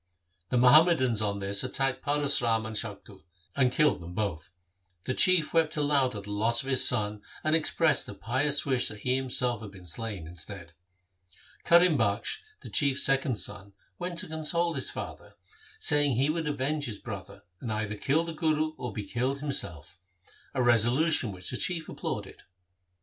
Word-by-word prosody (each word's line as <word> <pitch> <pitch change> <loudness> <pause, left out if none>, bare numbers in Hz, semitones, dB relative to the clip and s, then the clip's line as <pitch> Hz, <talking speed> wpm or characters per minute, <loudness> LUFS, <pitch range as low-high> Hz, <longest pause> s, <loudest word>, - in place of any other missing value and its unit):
The 125 - 0
Muhammadans 130 -3 +5
on 100 -1 -1
this 100 0 0
attacked 135 +1 -1
Paras 145 -1 +2
Ram 115 -2 0
and 110 0 -6
Shaktu, 105 -3 -4 0.3
and 130 -3 +2
killed 150 -7 +2
them 85 +1 -9
both. 100 -7 -3 0.5
The 130 - -2
Chief 180 +1 +3
wept 160 -2 +1
aloud 145 -4 +1
at 100 - -6
the 105 - -8
loss 115 +5 +2
of 135 - -7
his 130 -1 +6
son, 105 -3 +3 0.2
and 155 +1 +2
expressed 160 -1 +2
a 100 - -8
pious 135 +8 +2
wish 130 -3 +1
that 105 -1 -7
he 125 +3 0
himself 125 -3 -1
had 105 - -8
been 95 -2 -15
slain 100 0 -4
instead. 85 +1 -10 0.9
Karim 170 -3 +5
Bakhsh, 100 -2 -1 0.2
the - - -9
Chief's 140 -1 +3
second 135 -1 +3
son, 100 -1 -3 0.3
went 175 -1 -4
to - - -2
console 165 +2 -1
his 135 -4 -1
father, - - -8 0.4
saying 145 -3 +2
he 135 +5 +1
would 160 -1 -3
avenge 145 +1 -2
his 110 -3 -5
brother, 100 -2 -9 0.2
and 115 - -5
either 110 -1 -3
kill 140 +9 0
the 165 -1 -6
Guru 155 -1 0
or 125 - -5
be 105 +1 -5
killed 125 +7 -2
himself 90 - -4 0.3
— - - -28
a 130 - +1
resolution 120 +3 +3
which 90 -1 -6
the - - -3
chief 165 -3 -2
applauded. - - -6
125 Hz, 175 wpm, -28 LUFS, 105-150 Hz, 0.9 s, his